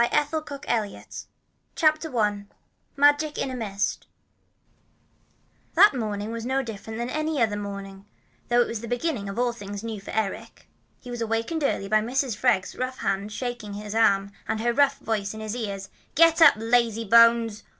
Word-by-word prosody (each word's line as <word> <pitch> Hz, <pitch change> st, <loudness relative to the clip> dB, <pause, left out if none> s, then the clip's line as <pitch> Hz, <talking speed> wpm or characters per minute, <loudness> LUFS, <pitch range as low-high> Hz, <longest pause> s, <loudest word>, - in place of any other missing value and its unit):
MORE 235 Hz, -, +3 dB
MAGIC 295 Hz, -1 st, -1 dB
IN -, -, +1 dB
A 205 Hz, -, -6 dB
MIST -, -, -10 dB, 0.5 s
CHAPTER 310 Hz, -4 st, +1 dB
I 205 Hz, -2 st, 0 dB, 0.5 s
MAGIC 290 Hz, +2 st, +3 dB
IN 265 Hz, -, -2 dB
A -, -, -4 dB
MIST 205 Hz, -4 st, -3 dB, 1.7 s
That 410 Hz, -, +7 dB
morning 215 Hz, -3 st, -3 dB
began 230 Hz, +1 st, -5 dB
no 270 Hz, +1 st, 0 dB
differently 220 Hz, 0 st, -6 dB
from 250 Hz, -, -5 dB
any 300 Hz, -9 st, 0 dB
morning, 200 Hz, -1 st, -7 dB, 0.4 s
though 240 Hz, 0 st, +4 dB
it -, -, +1 dB
was 230 Hz, -, -4 dB
to 235 Hz, -, -7 dB
be 245 Hz, -, 0 dB
the -, -, -7 dB
beginning 240 Hz, -9 st, -2 dB
of 195 Hz, -, -7 dB
all 245 Hz, 0 st, +1 dB
things 205 Hz, -2 st, -7 dB
new 220 Hz, -3 st, -5 dB
for -, -, -12 dB
Eric. 215 Hz, -3 st, -4 dB, 0.3 s
He 245 Hz, -, -9 dB
was 240 Hz, -1 st, -5 dB
awakened 230 Hz, +8 st, -1 dB
early 195 Hz, -7 st, 0 dB
by 215 Hz, +1 st, +3 dB
Mrs. 250 Hz, +1 st, -1 dB
Freg's 210 Hz, -5 st, +1 dB
rough 255 Hz, 0 st, -3 dB
hand 195 Hz, +2 st, -2 dB
shaking 240 Hz, -3 st, -5 dB
him 205 Hz, -, -7 dB
by 210 Hz, -, -8 dB
the 225 Hz, -, 0 dB
arm, 200 Hz, -2 st, +3 dB, 0.2 s
and 220 Hz, -, -1 dB
her 235 Hz, +1 st, +1 dB
rough 280 Hz, +1 st, +3 dB
voice 210 Hz, -2 st, -3 dB
in -, -, -7 dB
his 215 Hz, +1 st, -4 dB
ears: 200 Hz, -5 st, -5 dB, 0.3 s
"Get 330 Hz, +2 st, +5 dB
up, 305 Hz, -3 st, +9 dB
lazy 230 Hz, 0 st, +1 dB
bones! 230 Hz, 0 st, +5 dB
230 Hz, 190 wpm, -25 LUFS, 205-260 Hz, 1.7 s, up